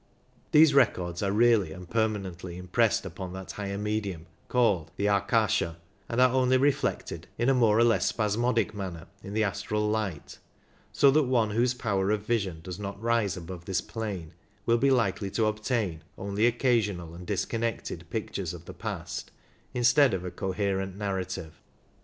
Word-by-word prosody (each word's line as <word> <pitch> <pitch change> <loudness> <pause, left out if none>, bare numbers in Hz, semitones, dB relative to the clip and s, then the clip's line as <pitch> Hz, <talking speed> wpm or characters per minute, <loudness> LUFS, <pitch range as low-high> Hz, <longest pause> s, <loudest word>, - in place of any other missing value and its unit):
These 155 -1 +7
records 90 -10 +2
are 100 -1 +1
really 110 -5 +4
and 90 +2 -9
permanently 95 -5 -2
impressed 90 0 +1
upon 90 -1 -6
that 95 0 -7
higher 100 -1 -4
medium 100 -5 -3 0.2
called 100 -11 +2
the 100 - -1
Akasha, 100 -4 +2 0.3
and 115 - -1
are 130 0 +5
only 130 0 +4
reflected 140 +1 0
in 120 +3 +2
a - - +5
more 115 -4 +4
or 115 - +6
less 120 -1 +3
spasmodic 115 +1 +1
manner 95 -5 -6 0.2
in 100 +1 -7
the 110 - +3
astral 105 +2 -1
light, 105 -8 -3 0.5
so 140 - +5
that 150 +1 +3
one 120 -4 +2
whose 120 +3 +2
power 100 -5 0
of 105 0 0
vision 100 -8 -1
does 90 +2 -7
not 100 -1 -5
rise 115 -4 +1
above 85 0 -8
this 95 -3 0
plane 100 -8 -5 0.3
will 115 0 +3
be 140 - +3
likely 105 -6 +1
to 110 +3 +1
obtain 110 -6 -1
only 100 +3 +1
occasional 110 -9 +1
and 90 +1 -10
disconnected 115 +2 -2
pictures - - -3
of - - -12
the - - -8
past - - -5 0.4
instead 125 0 +4
of 90 -1 -5
a 90 - -4
coherent 95 -1 -2
narrative. 95 -6 -4
105 Hz, 165 wpm, -28 LUFS, 95-115 Hz, 0.5 s, These